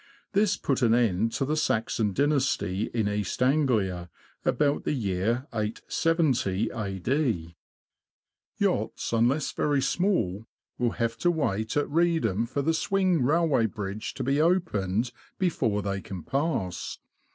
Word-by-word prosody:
This 205 Hz, -1 st, +3 dB
put 135 Hz, -1 st, -1 dB
an 115 Hz, -2 st, +4 dB
end 115 Hz, -2 st, +2 dB
to 135 Hz, -, 0 dB
the 150 Hz, +3 st, 0 dB
Saxon 110 Hz, -6 st, 0 dB
dynasty 120 Hz, -6 st, 0 dB
in 110 Hz, -3 st, 0 dB
East 105 Hz, +3 st, -1 dB
Anglia, 110 Hz, -, +1 dB, 0.3 s
about 145 Hz, -1 st, +1 dB
the -, -, 0 dB
year 115 Hz, +1 st, -1 dB
870 115 Hz, -, 0 dB
A.D. 100 Hz, -, -1 dB, 1.0 s
Yachts, -, -, -1 dB
unless 125 Hz, +6 st, +2 dB
very 145 Hz, -2 st, +1 dB
small, 130 Hz, -, 0 dB, 0.3 s
will 120 Hz, -1 st, +1 dB
have 115 Hz, -1 st, -1 dB
to 175 Hz, -, +3 dB
wait 110 Hz, -, -1 dB
at 145 Hz, -, +1 dB
Reedham 145 Hz, -, +1 dB
for 140 Hz, +3 st, -2 dB
the 165 Hz, -, +2 dB
swing 185 Hz, -1 st, +1 dB
railway 145 Hz, -4 st, +3 dB
bridge 105 Hz, 0 st, -5 dB
to 130 Hz, -, -3 dB
be 140 Hz, +4 st, +2 dB
opened 120 Hz, -, +1 dB, 0.3 s
before 120 Hz, -, 0 dB
they 100 Hz, -1 st, -2 dB
can 95 Hz, -4 st, -7 dB
pass. 135 Hz, -, -2 dB
120 Hz, 130 wpm, -27 LUFS, 105-150 Hz, 1.0 s, an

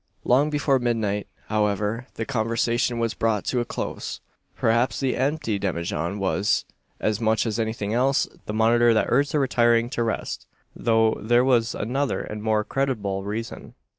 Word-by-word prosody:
Long 135 Hz, +5 st, +3 dB
before 145 Hz, -2 st, +2 dB
midnight, 110 Hz, -4 st, -1 dB, 0.2 s
however, 105 Hz, +3 st, -1 dB
the 115 Hz, -, -3 dB
conversation 120 Hz, 0 st, 0 dB
was 115 Hz, -1 st, 0 dB
brought 110 Hz, -3 st, 0 dB
to 125 Hz, -, 0 dB
a 120 Hz, -, -1 dB
close. -, -, -5 dB, 0.4 s
Perhaps 115 Hz, 0 st, +1 dB
the 135 Hz, -2 st, 0 dB
empty 135 Hz, -7 st, -1 dB
demijohn 85 Hz, -1 st, -2 dB
was, 100 Hz, +1 st, +1 dB, 0.3 s
as 110 Hz, +1 st, 0 dB
much 110 Hz, +1 st, +2 dB
as 110 Hz, 0 st, -2 dB
anything 110 Hz, -2 st, -2 dB
else, 130 Hz, +3 st, +2 dB, 0.2 s
the 105 Hz, -, -3 dB
monitor 115 Hz, +1 st, +4 dB
that 110 Hz, -, +3 dB
urged 140 Hz, +3 st, +2 dB
their 150 Hz, -, +2 dB
retiring 120 Hz, -2 st, +2 dB
to 120 Hz, -, -2 dB
rest; 115 Hz, -1 st, -3 dB, 0.3 s
though 115 Hz, -1 st, +3 dB
there 120 Hz, +3 st, +3 dB
was 120 Hz, -3 st, +2 dB
another 135 Hz, +5 st, -1 dB
and 105 Hz, 0 st, -6 dB
more 110 Hz, 0 st, +1 dB
creditable 105 Hz, -8 st, -2 dB
reason. 110 Hz, +3 st, -6 dB
115 Hz, 160 wpm, -24 LUFS, 105-125 Hz, 0.4 s, monitor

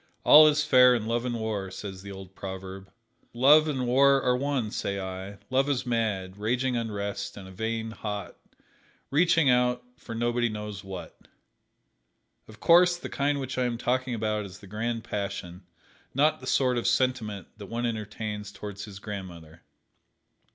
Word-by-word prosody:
"All 155 Hz, +1 st, +9 dB
is 150 Hz, 0 st, +2 dB
fair 125 Hz, -3 st, +6 dB
in 110 Hz, -3 st, -2 dB
Love 115 Hz, +2 st, -1 dB
and 120 Hz, -1 st, -2 dB
War," 105 Hz, -3 st, -3 dB
says 95 Hz, 0 st, -7 dB
the 100 Hz, +1 st, -9 dB
old 95 Hz, -1 st, -10 dB
proverb. 95 Hz, 0 st, -8 dB, 0.4 s
Love 150 Hz, +5 st, +6 dB
and 130 Hz, -4 st, -1 dB
War 135 Hz, +3 st, +5 dB
are 125 Hz, -1 st, +3 dB
one, 130 Hz, -4 st, -1 dB
say 100 Hz, -2 st, -2 dB
I. 95 Hz, +1 st, -6 dB
Love 135 Hz, +2 st, +2 dB
is 135 Hz, -3 st, 0 dB
mad, 105 Hz, -6 st, -1 dB
raging 125 Hz, +4 st, 0 dB
unrest 100 Hz, -3 st, -4 dB
and 95 Hz, -2 st, -9 dB
a -, -, -11 dB
vain, 110 Hz, +3 st, -3 dB
hot, 105 Hz, -3 st, -5 dB, 0.8 s
reaching 165 Hz, +1 st, +4 dB
out 125 Hz, -1 st, +3 dB
for 115 Hz, -, -8 dB
nobody 120 Hz, +1 st, +1 dB
knows 105 Hz, -1 st, -6 dB
what. 95 Hz, -2 st, -8 dB, 1.3 s
Of 110 Hz, 0 st, -14 dB
course 175 Hz, +1 st, +5 dB
the -, -, -7 dB
kind 140 Hz, 0 st, 0 dB
which 130 Hz, -1 st, -4 dB
I 125 Hz, -, +2 dB
am 120 Hz, -1 st, -1 dB
talking 125 Hz, +1 st, -1 dB
about 105 Hz, -1 st, -1 dB
is 100 Hz, -1 st, -10 dB
the 100 Hz, -, -14 dB
Grand 115 Hz, +3 st, -3 dB
Passion, 95 Hz, -3 st, -5 dB, 0.5 s
not 155 Hz, +3 st, +3 dB
the 130 Hz, -, -10 dB
sort 125 Hz, -2 st, +2 dB
of 120 Hz, -, -2 dB
sentiment 120 Hz, -6 st, 0 dB
that 100 Hz, -2 st, -9 dB
one 120 Hz, +3 st, -3 dB
entertains 105 Hz, -2 st, -4 dB
towards 105 Hz, 0 st, -7 dB
his 100 Hz, -2 st, -10 dB
grandmother. 90 Hz, -5 st, -8 dB
115 Hz, 165 wpm, -27 LUFS, 100-125 Hz, 1.3 s, All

